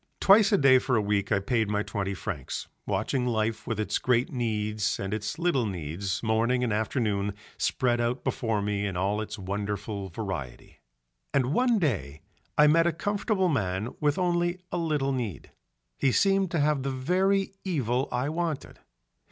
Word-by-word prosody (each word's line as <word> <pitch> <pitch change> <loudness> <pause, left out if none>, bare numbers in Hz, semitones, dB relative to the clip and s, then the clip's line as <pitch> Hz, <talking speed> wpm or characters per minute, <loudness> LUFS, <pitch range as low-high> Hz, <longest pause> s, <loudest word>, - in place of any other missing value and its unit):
Twice 200 +1 +6
a 200 - +5
day 135 -4 +6
for 125 0 0
a - - +4
week 100 0 0
I 100 - +3
paid 110 +2 0
my 105 0 0
twenty 100 -3 -3
francs, 90 - -5 0.2
watching 125 -2 0
life 110 -1 -1
with 115 -2 -2
its 110 - 0
great 125 +1 +1
needs 110 -4 -1
and 95 +1 -3
its 105 0 -3
little 165 -9 +1
needs 90 +2 -3
morning 115 +3 +2
and 115 -4 0
afternoon 105 -3 -1 0.2
spread 120 -2 +1
out 120 +2 -1
before 110 -4 -1
me 100 0 -1
in 95 -3 -4
all 100 +3 0
its 105 0 -6
wonderful 100 +1 -4
variety. 85 - -6 0.6
And 135 0 +2
one 245 +3 +3
day 90 - -1 0.4
I 150 - +7
met 165 +3 +5
a - - +3
comfortable 200 +2 0
man 100 - -1
with 145 -1 +1
only 175 -1 +1
a - - -1
little 150 -4 0
need, 120 -9 -4 0.5
he 135 - +3
seemed 195 +4 +3
to 170 - -1
have 145 -1 +2
the 135 - -2
very 185 +9 +1
evil 135 - 0
I 125 +2 0
wanted. 160 -2 -3
120 Hz, 170 wpm, -27 LUFS, 105-150 Hz, 0.6 s, I